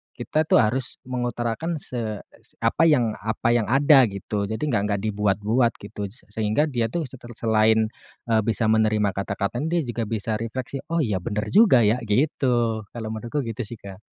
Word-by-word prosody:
kita 155 Hz, 0 st, -1 dB
tuh -, -, +4 dB
harus 120 Hz, +4 st, -1 dB
mengutarakan 120 Hz, +5 st, -2 dB
se 115 Hz, -7 st, -5 dB, 0.4 s
apa 165 Hz, -, +3 dB
yang 125 Hz, -8 st, +3 dB
apa 110 Hz, +2 st, -1 dB
yang 120 Hz, -2 st, +2 dB
ada 135 Hz, 0 st, +6 dB
gitu, 100 Hz, 0 st, -3 dB
jadi 110 Hz, +6 st, -4 dB
enggak 120 Hz, -10 st, +1 dB
enggak 100 Hz, -2 st, -1 dB
dibuat-buat 105 Hz, +3 st, +1 dB
gitu, 100 Hz, 0 st, -6 dB, 0.2 s
sehingga 110 Hz, +6 st, +1 dB
dia 120 Hz, -3 st, 0 dB
tuh 165 Hz, +9 st, -2 dB
seter 125 Hz, -3 st, -10 dB
selain, 110 Hz, 0 st, +2 dB, 0.4 s
eee, 110 Hz, -, +4 dB
bisa 115 Hz, +1 st, +1 dB
menerima 110 Hz, -2 st, +2 dB
kata-kata 100 Hz, +3 st, -3 dB
dia 170 Hz, 0 st, +1 dB
juga 120 Hz, -3 st, -3 dB
bisa 110 Hz, 0 st, -2 dB
refleksi, 120 Hz, +4 st, -4 dB
"Oh 165 Hz, -1 st, 0 dB
iya 105 Hz, -7 st, -1 dB
bener 105 Hz, +4 st, -3 dB
juga 195 Hz, -, +6 dB
ya," 110 Hz, +4 st, +3 dB
gitu, 120 Hz, -2 st, +1 dB
kalau 110 Hz, -2 st, -5 dB
menurutku 115 Hz, +6 st, -3 dB
gitu 115 Hz, -1 st, -6 dB
sih, 120 Hz, -, -7 dB
Kak. 100 Hz, -2 st, -12 dB
115 Hz, 170 wpm, -24 LUFS, 105-130 Hz, 0.4 s, ada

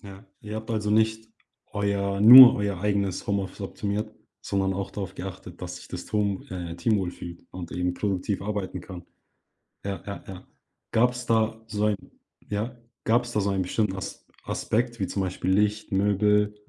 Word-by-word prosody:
Ja, 100 Hz, -1 st, -12 dB, 0.2 s
Ihr 105 Hz, +1 st, -6 dB
habt 110 Hz, +2 st, -6 dB
also 105 Hz, -2 st, -1 dB
nicht 110 Hz, +1 st, +2 dB, 0.4 s
euer 100 Hz, -1 st, -1 dB
nur 125 Hz, +3 st, +12 dB
euer 100 Hz, -3 st, -2 dB
eigenes 100 Hz, -2 st, -1 dB
Homeoffice 100 Hz, -2 st, -2 dB
optimiert, 105 Hz, +2 st, -3 dB, 0.3 s
sondern 95 Hz, -1 st, -1 dB
auch 95 Hz, 0 st, -4 dB
darauf 95 Hz, -2 st, -6 dB
geachtet, 90 Hz, -2 st, -8 dB
dass 90 Hz, 0 st, -5 dB
sich -, -, -12 dB
das 90 Hz, -, -7 dB
Tohm 100 Hz, -2 st, -1 dB
äh, 85 Hz, -2 st, -5 dB
Team 110 Hz, +4 st, +2 dB
wohlfühlt 90 Hz, -2 st, -6 dB
und 90 Hz, -2 st, -8 dB
eben 90 Hz, 0 st, -1 dB
produktiv 100 Hz, 0 st, -2 dB
arbeiten 100 Hz, -3 st, -3 dB
kann. 90 Hz, 0 st, -10 dB, 0.8 s
Ja, 100 Hz, -1 st, -4 dB
ja, 100 Hz, -, -7 dB
ja. 95 Hz, -1 st, -10 dB, 0.5 s
Gab's 125 Hz, +1 st, +2 dB
da 110 Hz, 0 st, +1 dB
so 105 Hz, -1 st, -2 dB
ein 105 Hz, -2 st, +2 dB, 0.5 s
ja? 110 Hz, +4 st, -3 dB, 0.3 s
Gab's 120 Hz, +1 st, +2 dB
da 105 Hz, -, +1 dB
so 100 Hz, -, 0 dB
einen 95 Hz, -1 st, 0 dB
bestimmten 95 Hz, +1 st, -1 dB
Asp 95 Hz, -, -7 dB, 0.2 s
Aspekt 120 Hz, +1 st, -1 dB
wie 95 Hz, -, -1 dB
zum 100 Hz, -, -3 dB
Beispiel 95 Hz, 0 st, -2 dB
Licht, 105 Hz, +3 st, +1 dB
Möbel, 105 Hz, +1 st, +2 dB
100 Hz, 170 wpm, -26 LUFS, 95-110 Hz, 0.8 s, nur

